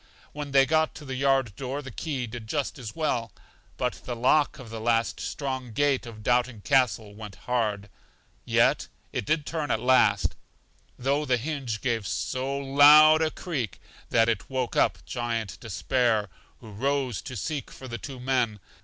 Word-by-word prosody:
When 150 -1 -5
they 135 -1 +5
got 155 +1 +1
to 150 - -10
the 135 - -5
yard 135 -5 +1
door 135 +2 -4
the 130 - -8
key 140 -6 -3
did 115 -1 -8
just 145 +2 -2
as 110 -4 -7
well; 125 -8 -1 0.5
but - - -2
the 120 - -4
lock 130 +5 +2
of 125 -4 -11
the 115 -1 -6
last 115 0 +1
strong 130 -4 -4
gate 140 0 +1
of 110 -2 -10
Doubting 120 -2 +1
Castle 115 -5 +1
went 105 -2 -9
hard, 105 -5 -1 0.6
yet - - +2 0.3
it - - -2
did 155 -1 +1
turn 155 -3 -3
at - - +1
last, 110 -6 +3 0.6
though 140 +4 0
the 130 -4 +2
hinge 130 -4 -4
gave 115 -6 -1
so 130 +10 -2
loud 145 +3 +7
a 160 - +2
creak 130 - -4 0.3
that 115 -1 +4
it 110 -4 -1
woke 130 -2 -2
up - - +1
Giant 115 -4 -3
Despair, 110 0 0 0.3
who 110 - -11
rose 130 -1 -1
to 130 - -8
seek 140 - -3
for 130 - -10
the 120 -1 -5
two 135 -3 -8
men. 125 -4 0
125 Hz, 170 wpm, -27 LUFS, 115-140 Hz, 0.6 s, loud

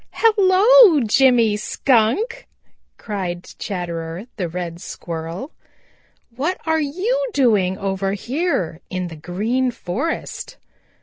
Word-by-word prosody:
"Hello, 420 -2 +6
Jimmy 235 -1 +4
Skunk," 270 - +1 0.5
cried 185 -5 -4 0.2
Chatterer 170 -1 -5
the 180 -4 -2
Red 170 0 -5
Squirrel. 165 - -6 0.8
"What 315 +9 -2
are 320 -1 +1
you 385 - -1
doing 205 -8 +2
over 195 -1 -2
here 220 - -2
in 185 -1 -3
the 165 - -9
Green 215 +11 -1
Forest?" 245 - -4
220 Hz, 100 wpm, -20 LUFS, -, 0.8 s, Hello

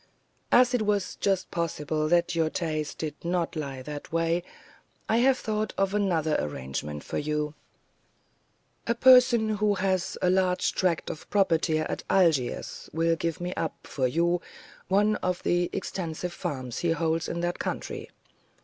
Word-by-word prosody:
"As 250 +1 +6
it 245 - +2
was 205 -2 0
just 195 -2 0
possible 155 -2 -1
that 170 +2 +2
your 165 -2 +1
taste 155 -3 -3
did 155 -2 -3
not 170 -1 -1
lie 140 -4 -4
that 145 +1 -7
way, 165 +1 +1 0.7
I 225 - +2
have 260 +2 +4
thought 215 -2 -2
of 195 0 +1
another 170 -7 +1
arrangement 75 +1 -4
for - - -3
you. 150 0 -2 1.3
A 235 - +2
person 240 -4 +6
who 210 0 +2
has 190 -1 0
a 180 - +2
large 185 -1 +2
tract 180 -3 0
of 155 - -10
property 165 -5 +2
at 155 - -2
Algiers 160 -10 +1
will 165 +1 +2
give 165 +2 -2
me 180 +1 -3
up, 160 - -2
for 130 -3 0
you, 170 +6 +1 0.5
one 210 +2 +3
of 180 -1 -2
the 175 0 +1
extensive 180 -2 -4
farms 130 -4 -4
he 170 -1 +1
holds 165 0 0
in 170 - -3
that 175 0 -2
country. - - -4
170 Hz, 155 wpm, -27 LUFS, 155-195 Hz, 1.3 s, As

